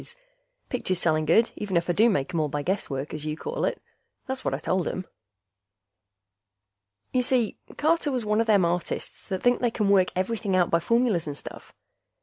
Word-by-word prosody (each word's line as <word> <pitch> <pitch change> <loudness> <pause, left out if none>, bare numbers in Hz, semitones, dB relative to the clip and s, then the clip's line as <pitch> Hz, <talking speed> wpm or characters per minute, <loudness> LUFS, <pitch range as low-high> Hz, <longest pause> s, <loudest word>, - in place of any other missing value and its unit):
pictures 185 -7 -1
selling 155 -3 +2
good, 220 +9 +4
even 195 -4 -1
if 170 - 0
I 175 - +2
do 225 +6 +5
make 175 -2 -1
'em 170 - +1
all 155 - +1
by 145 +1 -3
guesswork, 145 -7 -2
as 150 -1 -5
you 155 0 -3
call - - -2
it." - - -2 0.5
That's 265 0 -4
what - - 0
I - - -3
told 185 -1 -1
him. 185 - -3 2.1
Y'see, 250 -3 +1 0.2
Carter 315 -1 +2
was 250 -4 -1
one 210 +1 +2
a - - +3
them 205 -5 +4
artists 170 0 -3
that 190 -2 -3
think 245 0 +4
they 245 - +2
can 210 -3 0
work 190 -2 +5
everything 195 +1 -1
out 180 -2 +2
by 170 - +4
formulas 225 -4 +1
and 145 -1 -4
stuff. - - -9
190 Hz, 190 wpm, -26 LUFS, 170-235 Hz, 2.1 s, do